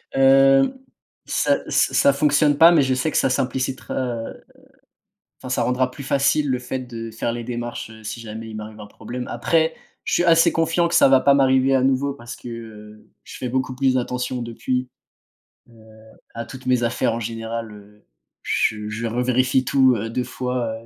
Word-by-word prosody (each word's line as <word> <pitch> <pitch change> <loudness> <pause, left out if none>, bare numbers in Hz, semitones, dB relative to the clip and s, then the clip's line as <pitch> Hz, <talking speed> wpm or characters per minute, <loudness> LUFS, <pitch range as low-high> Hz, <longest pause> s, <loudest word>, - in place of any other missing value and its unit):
Heu, 135 - +5 0.5
ça - - +1
ça - - +2
ça 140 - +4
fonctionne 145 0 +2
pas, 165 +2 +8
mais 160 -4 +4
je 130 -1 +1
sais 130 +5 -1
que - - -1
ça 135 - +2
simplicitera, 130 +1 -2
heu 120 -3 -4 1.0
enfin, - - -8
ça - - 0
rendra 125 0 0
plus 140 - -9
facile 140 +2 +1
le 125 -1 0
fait 130 +1 -4
de 115 -2 -7
faire 115 +1 -3
les 120 0 -5
démarches, 120 -1 -5
heu, 110 0 -14
si 110 +2 -6
jamais 115 0 -8
il 110 - -8
m'arrive 110 0 -8
un 105 - -9
problème. 125 +4 -7
Après, 160 +7 +1 0.3
je - - -3
suis - - +3
assez 165 -1 +5
confiant 165 +1 +1
que 170 - -2
ça 170 - +6
va 135 -1 +5
pas 140 - +5
m'arriver 135 -1 +3
à 130 - +2
nouveau 135 +1 +1
parce 120 -3 -10
que, - - -12
heu, 110 -2 -11
je - - -11
fais 125 - -4
beaucoup 130 0 -2
plus 130 0 +1
attention 125 0 -3
depuis, 125 +2 -3 0.8
heu, 115 - -20 0.6
à 115 - -5
toutes 130 +2 -11
mes 125 -1 +2
affaires. 120 +1 0
En 115 - -4
général, 115 0 -5
heu, 105 0 -16 0.4
je 105 -1 -1
je 110 +2 -4
revérifie 125 +2 +1
tout, 130 -1 +4
heu, 115 +1 -4
2 125 +2 -2
fois, 125 -4 -3
125 Hz, 195 wpm, -21 LUFS, 115-135 Hz, 1.0 s, pas